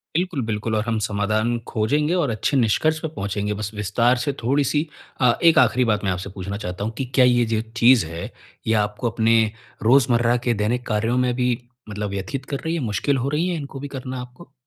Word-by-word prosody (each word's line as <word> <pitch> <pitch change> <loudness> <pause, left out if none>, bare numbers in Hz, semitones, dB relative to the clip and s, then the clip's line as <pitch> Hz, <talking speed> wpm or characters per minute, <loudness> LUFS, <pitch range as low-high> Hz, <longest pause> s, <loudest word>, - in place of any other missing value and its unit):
बिल्कुल, 175 -4 0
बिल्कुल 110 0 -2
और 105 - +1
हम 115 -1 0
समाधान 110 +2 0
खोजेंगे 145 +8 +1
और 170 -7 +1
अच्छे 115 +5 0
निष्कर्ष 145 +7 +2
पे - - -2
पहुँचेंगे। 100 +1 -2
बस 105 0 -4
विस्तार 115 +5 +2
से 140 - -1
थोड़ी-सी 145 +4 +1 0.3
अ, 125 -2 +6
एक 165 -1 +6
आखिरी 125 0 +3
बात 105 -2 0
मैं 95 - +1
आपसे 90 +2 -4
पूछना 100 +1 -5
चाहता 90 -2 -5
हूँ 110 - -2
कि 135 - -2
क्या 130 - +6
ये 120 -1 +4
जो 110 -1 0 0.2
चीज़ 120 -4 +6
है, 85 +1 -6 0.4
ये 110 - +3
आपको 105 +3 -3
अपने 115 -1 +2 0.3
रोज़मर्रा 120 -1 +4
के 120 - +4
दैनिक 120 +3 -1
कार्यों 110 +3 0
में 125 -1 +2
भी 125 0 +1 0.4
मतलब 105 0 -4
व्यथित 100 +8 -4
कर 140 - -3
रही 160 - 0
है, 165 - -2
मुश्किल 120 +4 0
हो 130 +2 -1
रही 155 +5 0
है 180 - -1
इनको 140 -2 -7
भी 145 - -5
करना 130 -2 -6
है 125 - -4
आपको? 125 +6 -13
120 Hz, 215 wpm, -22 LUFS, 105-135 Hz, 0.4 s, अ